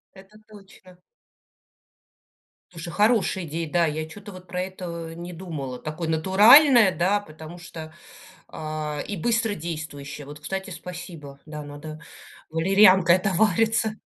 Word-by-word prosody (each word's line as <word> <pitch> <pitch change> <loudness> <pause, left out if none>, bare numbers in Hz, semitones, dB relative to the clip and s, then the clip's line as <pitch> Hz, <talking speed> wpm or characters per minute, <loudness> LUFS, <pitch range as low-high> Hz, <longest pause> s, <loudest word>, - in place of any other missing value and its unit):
Это 195 +2 -16
точно. 195 -3 -17 1.7
Слушай, 170 0 -7
хорошая 210 -3 +2
идея, 160 +1 -4
да, 175 -1 +3
я 155 0 -3
чё-то 205 +5 -11
вот 185 -1 -12
про 180 +1 -4
это 170 -3 -7
не 175 +1 -8
думала, 155 -8 -6
такое 155 +2 -5
натуральное, 210 - +6
да, 190 +4 +2
потому 160 -2 -11
что, 160 -2 -10 0.6
а, 155 -1 -5
и 205 - -4
быстродействующее. 160 -10 -3
Вот, 145 +1 -10
кстати, 190 +5 -5
спасибо, 170 -6 -9
да, 150 -1 -7
надо 145 +2 -9 0.5
валерьянкой 185 +1 +5
отовариться. 215 +3 +1
175 Hz, 120 wpm, -24 LUFS, 155-195 Hz, 1.7 s, натуральное